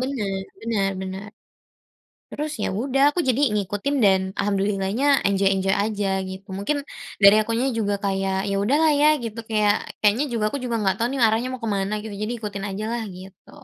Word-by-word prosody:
Bener 215 -8 -2 0.2
bener 215 -4 0
bener, 190 +2 -6 1.1
terus 300 +1 -3
ya - - 0
udah 270 0 0
aku 355 - -2
jadi 250 - +2 0.2
ngikutin 205 +7 -1
dan 190 -1 +5 0.2
alhamdulillah-nya 200 +4 0 0.2
enjoy-enjoy 195 -1 +2
aja 210 -2 -2 0.2
gitu. 190 +1 -9
Mungkin 205 +10 -1 0.5
dari 200 +1 +9
akunya 230 +4 -1
juga 205 -2 0
kayak 195 -1 0
ya 200 - 0
udahlah 295 +8 +3
ya 300 - +6 0.2
gitu, 225 -1 -5
kayak 210 -2 +3 0.3
kayaknya 215 +7 +3
juga 230 -2 -1
aku 280 - -3
juga 240 -2 -2
nggak 190 -2 +1
tahu 230 - +1
nih 270 - -2
arahnya 225 +3 +1
mau 255 - -7
ke - - -1
mana 195 +2 -2
gitu, 215 -1 -7
jadi 215 +2 -2
ikutin 200 -2 -5
ajalah 220 +4 -3 0.2
gitu. 190 0 -14
210 Hz, 175 wpm, -23 LUFS, 195-235 Hz, 1.1 s, dari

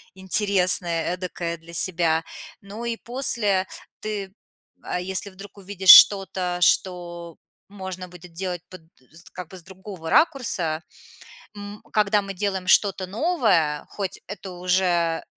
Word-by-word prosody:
интересное, 185 -3 0
эдакое 175 -2 -4
для 165 +1 -15
себя. 165 -3 +1 0.4
Ну 210 +4 -8
и 235 -1 -2
после 225 -7 -1 0.3
ты, 205 -3 -5 0.5
а 180 - -4
если 190 +2 -3
вдруг 195 +2 -13
увидишь 195 -1 -3
что-то, 185 -3 +6
что 175 -2 0 0.3
можно 190 -2 -7
будет 180 0 -14
делать 180 0 -4
под 185 -2 -11 0.3
з 170 +2 -14
как 180 -2 -8
бы 185 - -10
с 170 - -9
другого 190 -3 -9
ракурса 185 - +1 0.7
м, 205 0 -9
когда 210 -1 +2
мы 195 0 -7
делаем 190 -1 -3
что-то 195 -2 +3
новое, 200 - +1
хоть 195 -3 -5
это 195 -1 -8
уже 180 -2 0
185 Hz, 130 wpm, -23 LUFS, 175-200 Hz, 0.7 s, что-то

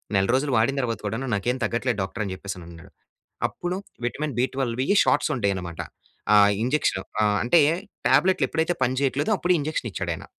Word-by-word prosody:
నెల 95 - +3
రోజులు 135 +2 +1
వాడిన 120 +5 +2
తర్వాత 115 -4 -2
కూడా 110 +2 -2 0.2
నాకేం 120 +6 -1
తగ్గట్లేదు 120 +1 -1
డాక్టర్ 100 +3 -3
అని 95 - -4
చెప్పేసి 100 +1 -6
అని 85 - -11
అన్నాడు. 85 -1 -13 0.6
అప్పుడు 175 +1 -4 0.3
విటమిన్-బి12వి 130 -1 -1 0.2
షాట్స్ - - +2
ఉంటాయి 100 -5 +1
అన్నమాట. 85 -3 -6 0.5
ఆ! - - +8 0.3
ఇంజెక్షన్ 125 -7 +1 0.2
ఆ! - - +4 0.2
అంటే 155 +8 +5 0.5
టాబ్లెట్లు 180 -7 +3
ఎప్పుడైతే 160 +2 0
పని 130 +1 +1
చేయట్లేదో 140 +6 0
అప్పుడు 180 +1 +2
ఇంజెక్షన్ 145 -5 -2
ఇచ్చాడు 90 -2 -3
ఆయన. - - -9
125 Hz, 170 wpm, -24 LUFS, 100-145 Hz, 0.6 s, ఆ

